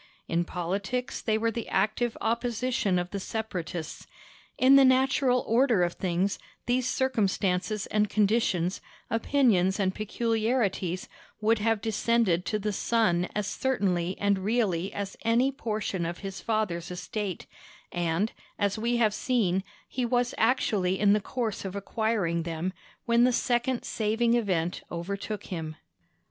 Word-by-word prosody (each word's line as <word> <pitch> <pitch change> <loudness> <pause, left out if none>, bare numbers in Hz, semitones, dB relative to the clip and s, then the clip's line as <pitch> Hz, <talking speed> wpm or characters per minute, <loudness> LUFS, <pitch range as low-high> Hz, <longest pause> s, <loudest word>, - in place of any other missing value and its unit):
In 170 +1 0
politics 195 +9 -3
they 220 -1 +1
were 230 +1 +1
the 230 0 -5
active 220 +4 0
opposition 235 -3 0
of 180 0 -2
the 200 - -3
Separatists. 180 -6 -5 0.5
In 265 +2 +6
the 275 - +8
natural 260 -1 +3
order 230 -4 +3
of 175 0 0
things, 185 +2 -1 0.3
these 250 0 +1
circumstances 210 -5 0
and 210 -1 +1
conditions, 200 -4 +1 0.3
opinions 225 -6 +2
and 190 -1 +1
peculiarities, 215 -4 -1 0.3
would 220 +1 +2
have 225 0 +1
descended 220 -5 +1
to 215 - 0
the 210 0 -2
son 185 -5 +1
as 210 -1 0
certainly 190 -7 0
and 200 -1 +2
really 195 -3 0
as 200 -1 -5
any 235 +4 +3
portion 215 -8 -3
of 170 +1 -3
his 195 -1 -5
father's 210 -7 -1
estate; 180 +1 -4 0.5
and, 175 +4 0 0.3
as 205 0 0
we 235 +2 +1
have 220 -3 +3
seen, 205 -6 +1 0.2
he 255 - -3
was 245 0 +1
actually 205 -6 +1
in 205 0 +4
course 225 0 -3
of 190 0 -5
acquiring 200 -4 0
them, 165 +2 -3 0.3
when 235 0 +4
the 250 - +5
second 245 +1 0
saving 225 +2 +1
event 185 -8 0
overtook 200 +5 -4
him. 160 -2 -4
210 Hz, 135 wpm, -28 LUFS, 185-235 Hz, 0.5 s, the